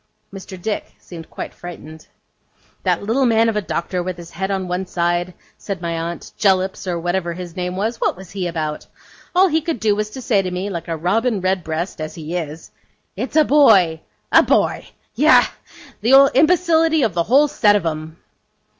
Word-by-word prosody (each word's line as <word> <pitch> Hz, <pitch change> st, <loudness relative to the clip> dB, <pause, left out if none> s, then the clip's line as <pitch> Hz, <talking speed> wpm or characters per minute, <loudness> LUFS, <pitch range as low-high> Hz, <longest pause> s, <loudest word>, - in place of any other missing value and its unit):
Mr. 190 Hz, -1 st, -9 dB
Dick 210 Hz, +3 st, -4 dB
seemed 165 Hz, -2 st, -11 dB
quite -, -, -7 dB
frightened. 160 Hz, -3 st, -11 dB, 0.7 s
'That -, -, 0 dB
little 245 Hz, +5 st, +1 dB
man 225 Hz, 0 st, +3 dB
of 225 Hz, -, -2 dB
a 210 Hz, -, +1 dB
doctor, 180 Hz, -1 st, -3 dB
with 180 Hz, 0 st, -4 dB
his 170 Hz, -1 st, -11 dB
head 190 Hz, +2 st, -3 dB
on 190 Hz, -2 st, -2 dB
one 180 Hz, +1 st, -3 dB
side,' 175 Hz, 0 st, -1 dB, 0.2 s
said 195 Hz, -2 st, -5 dB
my 170 Hz, -1 st, -3 dB
aunt, 165 Hz, +1 st, -5 dB
'Jellips, 190 Hz, -1 st, +1 dB
or 175 Hz, -2 st, -1 dB
whatever 175 Hz, 0 st, -2 dB
his 175 Hz, -1 st, -8 dB
name 180 Hz, 0 st, -3 dB
was, 220 Hz, +5 st, -2 dB
what -, -, 0 dB
was 190 Hz, -1 st, -12 dB
he 190 Hz, -3 st, -3 dB
about? 155 Hz, -3 st, -4 dB, 0.5 s
All 375 Hz, +2 st, +6 dB
he 320 Hz, -2 st, +1 dB
could 315 Hz, -5 st, -3 dB
do, 210 Hz, -1 st, +2 dB
was 210 Hz, 0 st, -2 dB
to 240 Hz, -, -9 dB
say 205 Hz, -5 st, +2 dB
to 185 Hz, -, -4 dB
me, 185 Hz, +3 st, -4 dB
like 170 Hz, -2 st, -5 dB
a 165 Hz, -1 st, -3 dB
robin 215 Hz, +7 st, 0 dB
redbreast 180 Hz, -3 st, -2 dB
as 155 Hz, -, -5 dB
he 160 Hz, +1 st, -6 dB
is 160 Hz, -2 st, -6 dB, 0.4 s
"It's 250 Hz, +8 st, -5 dB
a 310 Hz, -1 st, +5 dB
boy." 190 Hz, -, +4 dB, 0.3 s
A -, -, +7 dB
boy! -, -, +1 dB, 0.3 s
Yah, -, -, +5 dB, 0.6 s
the 270 Hz, +4 st, +6 dB
imbecility 320 Hz, 0 st, +3 dB
of 220 Hz, -6 st, +1 dB
the 170 Hz, -, +1 dB
whole 285 Hz, +4 st, +5 dB
set 210 Hz, -7 st, +3 dB
of 200 Hz, -4 st, 0 dB
'em! 155 Hz, 0 st, -4 dB
185 Hz, 190 wpm, -20 LUFS, 170-225 Hz, 0.7 s, A